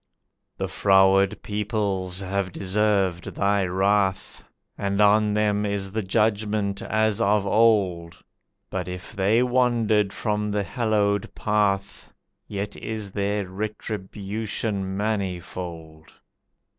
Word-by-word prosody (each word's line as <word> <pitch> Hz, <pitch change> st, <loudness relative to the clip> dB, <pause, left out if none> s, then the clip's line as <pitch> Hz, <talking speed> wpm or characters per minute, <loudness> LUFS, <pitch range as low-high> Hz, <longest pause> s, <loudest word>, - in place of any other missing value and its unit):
"The -, -, -2 dB
froward 95 Hz, 0 st, +3 dB
peoples 100 Hz, -3 st, -1 dB
have 95 Hz, -1 st, -2 dB
deserved 95 Hz, -2 st, 0 dB
Thy 100 Hz, 0 st, +2 dB
wrath, 95 Hz, +1 st, 0 dB, 0.3 s
And 100 Hz, 0 st, -2 dB
on 105 Hz, +1 st, +4 dB
them 105 Hz, -1 st, +1 dB
is 100 Hz, -2 st, -2 dB
the 110 Hz, +2 st, -1 dB
Judgment 105 Hz, 0 st, 0 dB
as 110 Hz, -1 st, 0 dB
of 100 Hz, 0 st, +2 dB
old, 95 Hz, -6 st, +2 dB, 0.5 s
But -, -, -3 dB
if 90 Hz, +3 st, -7 dB
they 105 Hz, +5 st, +3 dB
wandered 120 Hz, -5 st, +2 dB
from 105 Hz, -1 st, -2 dB
the 105 Hz, 0 st, 0 dB
hallowed 105 Hz, -3 st, 0 dB
path 105 Hz, -2 st, -1 dB, 0.4 s
Yet 100 Hz, 0 st, -4 dB
is 110 Hz, -3 st, -5 dB
their 100 Hz, 0 st, -1 dB
retribution 100 Hz, 0 st, -4 dB
manifold. 90 Hz, -6 st, -4 dB
100 Hz, 105 wpm, -24 LUFS, 95-105 Hz, 0.5 s, on